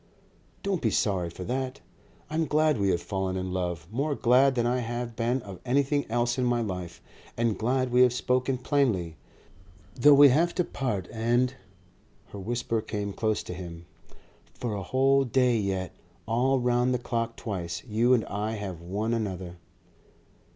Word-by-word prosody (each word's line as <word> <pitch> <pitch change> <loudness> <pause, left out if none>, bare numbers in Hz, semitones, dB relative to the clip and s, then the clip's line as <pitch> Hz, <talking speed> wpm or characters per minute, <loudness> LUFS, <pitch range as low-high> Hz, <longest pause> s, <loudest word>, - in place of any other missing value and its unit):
Don't 195 -4 -1
be 115 - +2
sorry 95 -5 0
for 90 +2 -8
that. 130 +4 -3 0.5
I - - -10
am 160 0 +1
glad 155 -4 +2
we 100 -1 +2
have 85 -2 0
fallen 95 -2 -2
in 95 0 -3
love, 90 -4 -3
more 140 +5 -1
glad 130 +2 +4
than 120 -1 +1
I 125 +1 +1
have 120 0 -4
been 120 +3 0
of 100 -3 -9
anything 140 +2 +1
else 120 +2 0
in - - +1
my 120 -1 +2
life, 90 -6 -5 0.3
and 115 -2 +1
glad 125 +4 0
we 125 +1 +5
have 125 -1 +6
spoken 125 +1 0
plainly.... 120 - 0 0.8
Though 145 +3 +6
we 140 0 +9
have 165 +6 +2
to 180 - +2
part. 105 - -3
And 120 +3 +1 0.4
" 100 +4 -34
Her 100 - -8
whisper 115 +2 -2
came 105 -2 -4
close 110 0 -1
to - - -6
him. 85 -1 -8 0.7
"For 120 -3 -3
a 100 - -3
whole 135 +7 +3
day 125 -1 +2
yet, 95 -2 -2 0.3
all 130 +4 +2
round 125 +1 +2
the - - +2
clock 115 -1 -3
twice, 90 -5 -5
you 120 +2 +3
and 115 - -1
I 105 +2 -3
have 100 -6 -5
one 105 +6 -2
another." 95 -6 -3
115 Hz, 175 wpm, -27 LUFS, 100-130 Hz, 0.8 s, we